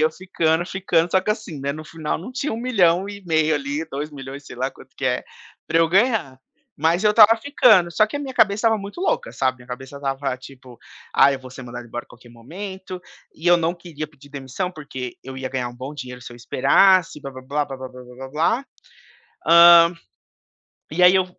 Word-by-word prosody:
eu 155 Hz, +1 st, +3 dB
ficando, 165 Hz, -1 st, 0 dB
ficando. 180 Hz, -3 st, 0 dB
Só 190 Hz, -, +3 dB
que 200 Hz, -, -2 dB
assim, 210 Hz, -9 st, -4 dB
né, 140 Hz, +1 st, -2 dB
no 155 Hz, +1 st, -8 dB
final 155 Hz, -1 st, -4 dB
não 205 Hz, +10 st, -9 dB
tinha 275 Hz, +1 st, -3 dB
1.500.000 185 Hz, -7 st, +1 dB
ali, 145 Hz, +2 st, -3 dB
2.000.000, 140 Hz, -1 st, -7 dB
sei 130 Hz, -, -11 dB
lá, 130 Hz, +2 st, -2 dB
quanto 130 Hz, -, -18 dB
que 135 Hz, -, -5 dB
é 125 Hz, -1 st, 0 dB, 0.4 s
para 165 Hz, +1 st, +1 dB
eu 165 Hz, -, +4 dB
ganhar, 195 Hz, -, +1 dB, 0.4 s
mas 165 Hz, +6 st, +1 dB
eu 210 Hz, -, +5 dB
estava 220 Hz, +1 st, +7 dB
ficando. 225 Hz, -, +4 dB
Só 215 Hz, +5 st, +3 dB
que 215 Hz, -, -6 dB
a -, -, -3 dB
minha 270 Hz, -3 st, -6 dB
cabeça 215 Hz, -3 st, +4 dB
estava 225 Hz, 0 st, +4 dB
muito 200 Hz, -, -8 dB
louca, 480 Hz, +6 st, -1 dB
sabe, 130 Hz, 0 st, -1 dB
minha 125 Hz, 0 st, -17 dB
cabeça 130 Hz, +3 st, -8 dB
estava, 135 Hz, -1 st, -3 dB
tipo: 130 Hz, -2 st, -14 dB, 0.4 s
"Ai, 140 Hz, +1 st, +5 dB
eu -, -, -5 dB
vou 130 Hz, -1 st, -12 dB
ser 130 Hz, 0 st, -10 dB
mandado 120 Hz, 0 st, -8 dB
embora 120 Hz, +1 st, -6 dB
a -, -, -38 dB
qualquer 120 Hz, 0 st, -17 dB
momento", 185 Hz, -, -8 dB, 0.3 s
e 165 Hz, -, -8 dB
eu 175 Hz, 0 st, +7 dB
não 170 Hz, +1 st, -1 dB
queria 165 Hz, -3 st, -7 dB
pedir 145 Hz, -1 st, -19 dB
demissão 140 Hz, +6 st, -4 dB
porque 140 Hz, -7 st, -8 dB
eu 130 Hz, +1 st, -9 dB
ia 130 Hz, 0 st, -4 dB
ganhar 130 Hz, -2 st, -3 dB
um 120 Hz, -, -12 dB
bom 130 Hz, +4 st, -7 dB
dinheiro 125 Hz, -3 st, -8 dB
se 120 Hz, -, -10 dB
eu -, -, -12 dB
esperasse 160 Hz, +8 st, +3 dB
blá, 135 Hz, -, -7 dB
blá, 130 Hz, -1 st, -11 dB
blá, 145 Hz, +3 st, -1 dB
blá, 135 Hz, -2 st, -8 dB
blá, 130 Hz, 0 st, -8 dB
blá, 125 Hz, -1 st, -13 dB
blá, 135 Hz, +1 st, -8 dB
blá. 165 Hz, -, 0 dB, 0.8 s
Hã, 170 Hz, 0 st, +8 dB, 1.0 s
e 175 Hz, +4 st, +2 dB
aí 180 Hz, +1 st, +7 dB
eu 185 Hz, -, +3 dB
155 Hz, 215 wpm, -22 LUFS, 130-185 Hz, 1.0 s, Hã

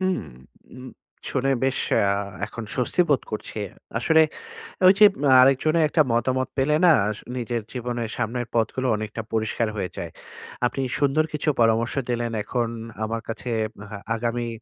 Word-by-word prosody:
হুম, 185 Hz, 0 st, 0 dB, 0.5 s
উম 130 Hz, 0 st, -10 dB, 0.4 s
শুনে 135 Hz, 0 st, 0 dB
বেশ 135 Hz, 0 st, +1 dB, 0.2 s
আ -, -, +3 dB, 0.4 s
এখন 115 Hz, +1 st, -7 dB
স্বস্তি 125 Hz, +7 st, 0 dB
বোধ 135 Hz, -, +3 dB
করছি। 110 Hz, 0 st, -6 dB, 0.4 s
আসলে 160 Hz, +6 st, +4 dB, 0.7 s
ঐযে 195 Hz, +3 st, +7 dB, 0.2 s
মা 140 Hz, -, +4 dB
আরেকজনের 155 Hz, +5 st, +4 dB
একটা 155 Hz, -, +3 dB
মতামত 130 Hz, +3 st, +1 dB
পেলে 145 Hz, +3 st, +2 dB
না, 175 Hz, -, +8 dB, 0.2 s
আস 105 Hz, -, -4 dB, 0.2 s
নিজের 120 Hz, -1 st, -2 dB
জীবনের 120 Hz, -2 st, -3 dB
সামনের 120 Hz, +1 st, -2 dB
পথগুলো 120 Hz, +3 st, 0 dB
অনেকটা 110 Hz, +1 st, -4 dB
পরিষ্কার 110 Hz, +1 st, 0 dB
হয়ে 95 Hz, -3 st, -2 dB
যায়। -, -, -5 dB, 0.5 s
আপনি 125 Hz, +2 st, -1 dB, 0.2 s
সুন্দর 145 Hz, +2 st, +3 dB
কিছু 150 Hz, 0 st, 0 dB
পরামর্শ 115 Hz, +1 st, +2 dB, 0.2 s
দিলেন। 120 Hz, -1 st, -1 dB
এখন 120 Hz, +1 st, -1 dB, 0.4 s
আমার 115 Hz, +1 st, -2 dB
কাছে 115 Hz, +2 st, -5 dB, 0.4 s
হা 105 Hz, -, -6 dB, 0.2 s
আগামী 120 Hz, +1 st, -2 dB
120 Hz, 150 wpm, -24 LUFS, 115-135 Hz, 0.7 s, না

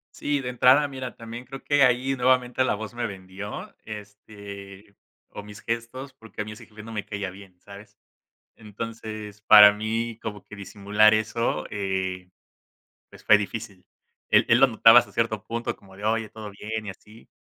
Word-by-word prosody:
Sí, 145 Hz, -1 st, -1 dB
de 125 Hz, -, -5 dB
entrada, 130 Hz, +4 st, +4 dB
mira, 130 Hz, -2 st, -7 dB
también 115 Hz, +1 st, -9 dB
creo 135 Hz, +2 st, -10 dB
que 145 Hz, -1 st, +2 dB
ahí 130 Hz, +1 st, +3 dB
nuevamente 125 Hz, 0 st, +2 dB
la 130 Hz, -, +1 dB
voz 110 Hz, +2 st, -7 dB
me 120 Hz, -1 st, -2 dB
vendió, 95 Hz, +1 st, -8 dB
este, 100 Hz, -1 st, -11 dB, 0.3 s
o -, -, -9 dB
mis 105 Hz, 0 st, -12 dB
gestos, 115 Hz, +4 st, -5 dB
porque 110 Hz, -1 st, -11 dB
a -, -, -1 dB
mi 105 Hz, -, -8 dB
ese 105 Hz, -, -12 dB
jefe 105 Hz, -1 st, -13 dB
no 115 Hz, +1 st, -10 dB
me 105 Hz, -2 st, -4 dB
caía 100 Hz, -2 st, -5 dB
bien, 95 Hz, -1 st, -15 dB
¿sabes? 100 Hz, +1 st, -14 dB, 0.6 s
Entonces, 110 Hz, -1 st, -8 dB
para 105 Hz, -1 st, +9 dB
mí 110 Hz, +2 st, -3 dB
como 105 Hz, -2 st, -6 dB
que 105 Hz, -, -12 dB
disimular 105 Hz, +2 st, +2 dB
eso, 110 Hz, +2 st, -1 dB
eh, 95 Hz, -2 st, -3 dB, 0.8 s
pues, -, -, -17 dB
fue 105 Hz, -, +7 dB
difícil. 105 Hz, -2 st, -6 dB, 0.4 s
Él -, -, +5 dB
él 115 Hz, -, +5 dB
lo 135 Hz, -, +8 dB
notaba 115 Hz, -1 st, +7 dB
hasta -, -, 0 dB
cierto 110 Hz, -3 st, -1 dB
punto 115 Hz, +1 st, -3 dB
como 95 Hz, -1 st, -18 dB
de: 100 Hz, -, -9 dB
"Oye, 110 Hz, 0 st, 0 dB
¿todo 110 Hz, -1 st, -9 dB
bien?", 110 Hz, +2 st, -6 dB
y -, -, -4 dB
así. 105 Hz, +4 st, -16 dB
110 Hz, 180 wpm, -25 LUFS, 100-115 Hz, 0.8 s, para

